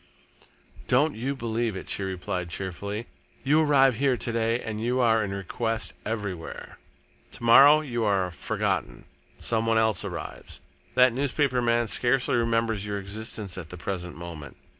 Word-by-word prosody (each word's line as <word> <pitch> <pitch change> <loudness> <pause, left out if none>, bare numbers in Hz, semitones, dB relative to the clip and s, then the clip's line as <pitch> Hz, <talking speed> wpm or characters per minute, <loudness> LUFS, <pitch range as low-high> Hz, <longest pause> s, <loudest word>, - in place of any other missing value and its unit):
"Don't 145 +5 +3
you 130 +5 -2
believe 115 -3 -2
it," 95 - -7
she - - -2
replied 90 -1 -3
cheerfully. 100 +5 -5 0.4
"You 150 +4 +4
arrive 135 -5 +4
here 135 -1 +2
to 120 - -3
day 115 +1 +1
and 110 -2 -5
you 125 +3 0
are 115 -3 +3
in 100 - -3
request 110 +4 -2
everywhere. 100 -7 -5 0.5
To - - -10
morrow 140 +6 +8
you 120 -6 -3
are 95 -4 +1
forgotten - - -2 0.3
some 115 -1 -1
one 115 0 +3
else 110 -1 +2
arrives. 85 -6 -7 0.4
That 125 -1 +6
newspaper 135 -1 0
man 120 0 +2
scarcely 125 +4 +1
remembers 115 -3 +1
your 105 -1 -3
existence 100 -1 -4
at 80 -3 -9
the 90 - -8
present 90 -1 -4
moment. 85 -5 -9
115 Hz, 155 wpm, -26 LUFS, 95-120 Hz, 0.5 s, morrow